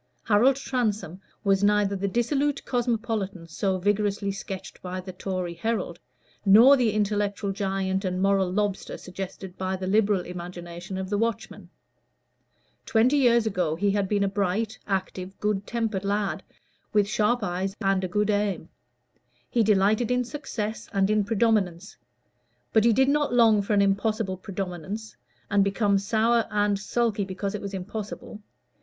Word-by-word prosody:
Harold 230 +5 +4
Transome 215 - -2 0.2
was 195 0 +2
neither 205 -1 +3
the 200 +1 -1
dissolute 275 +7 0
cosmopolitan 225 -7 -2
so 190 +3 -1
vigorously 205 +1 0
sketched 195 -1 -7
by 185 0 -5
the 185 0 -8
Tory 185 -2 -3
Herald, 220 +7 -2 0.4
nor 225 +8 +8
the 245 -4 +2
intellectual 205 -1 0
giant 195 -1 -1
and 185 -1 -2
moral 195 -1 +2
lobster 205 0 -2
suggested 185 0 -8
by 190 0 -1
the 185 0 -5
Liberal 200 0 +2
imagination 175 +1 -7
of 190 +1 -5
the 205 - +1
Watchman. 230 0 -3 1.1
Twenty 240 +6 +3
years 235 -4 +4
ago 180 -7 0
he 200 +4 +1
had 200 -1 0
been 205 -1 +2
a - - +2
bright, 205 +3 -1
active, 190 -1 -3
good 205 -1 -1
tempered 225 -5 -2
lad, 200 0 -1 0.5
with 205 -1 +3
sharp 220 +1 +1
eyes 190 +1 -2
and 195 -2 +1
a - - 0
good 210 +3 +1
aim; 205 -5 -1 0.8
he 235 - +3
delighted 215 +2 +3
in 250 0 +2
success 235 -5 -5
and 195 +1 +2
in 215 -1 +3
predominance; 200 -4 0 0.8
but 220 0 +4
he 235 - +6
did 265 +4 +3
not 290 -3 +1
long 225 -3 +5
for 200 +2 -1
an 200 -1 +4
impossible 200 0 0
predominance, 195 +3 -6 0.4
and 200 -1 +4
become 200 0 +2
sour 225 +3 +2
and 205 -1 +1
sulky 220 0 0
because 195 +1 -4
it 210 - -4
was 200 -1 -5
impossible. 210 +2 -6
200 Hz, 150 wpm, -26 LUFS, 190-220 Hz, 1.1 s, nor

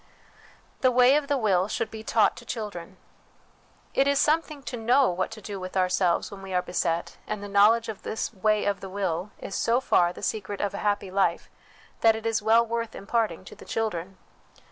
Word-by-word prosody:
The 255 - +4
Way 250 +2 +5
of 295 -1 0
the 285 - +1
Will 195 -6 +2
should 220 +1 -3
be 220 -1 -8
taught 220 -1 +3
to - - -10
Children. 205 -6 -6 1.0
It 275 - +3
is 280 0 +3
something 305 -1 +1
to 255 - -5
know 245 +1 +3
what 185 +1 -2
to 220 -2 -11
do 200 -1 -6
with 185 +1 -5
ourselves 185 -1 +1
when 200 -1 -9
we 190 -1 -5
are 180 - +3
beset, 170 -1 -2
and 210 -1 -4
the - - -5
knowledge 210 +3 +4
of 220 -3 -6
this 220 - -4
way 215 +1 +1
of 200 -1 0
the 195 - -8
will 185 -1 -2
is - - -8
so 235 +4 +2
far 175 -9 +3
the - - -11
secret 205 -2 -3
of 200 -1 -1
a 200 - -4
happy 205 -2 -1
life, 190 -3 0 0.5
that 225 -1 +5
it 220 0 -7
is 225 -1 +1
well 225 +2 +4
worth 230 0 -3
imparting 205 -4 -1
to - - -11
the - - -13
children. 195 -4 -3
210 Hz, 210 wpm, -26 LUFS, 190-230 Hz, 1.0 s, Way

